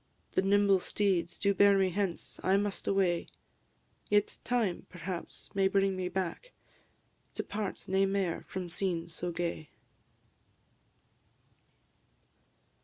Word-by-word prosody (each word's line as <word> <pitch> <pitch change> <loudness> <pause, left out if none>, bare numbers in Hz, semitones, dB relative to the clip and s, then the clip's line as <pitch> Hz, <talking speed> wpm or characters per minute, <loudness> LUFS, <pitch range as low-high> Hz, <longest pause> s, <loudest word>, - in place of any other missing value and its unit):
the - - +2
nimble 200 0 +4
steeds 180 -3 0
Do 200 -1 +2
bear 200 +1 +6
me 190 -1 +2
hence 190 -2 -2
I 190 +1 +3
must 205 -1 -2
away; 185 -3 +2 0.8
Yet 205 0 +2
time, 230 -8 0
perhaps, 180 0 -6
may 195 -1 +3
bring 195 0 +2
me 185 -1 -2
back, 190 - -3 0.8
To - - -2
part 205 -2 -4
nae 195 +1 +3
mair 195 -3 -1
from 185 -2 -4
scenes 175 -2 -2
so 175 +2 -3
gay. 170 -2 -3
190 Hz, 115 wpm, -31 LUFS, 175-200 Hz, 0.8 s, bear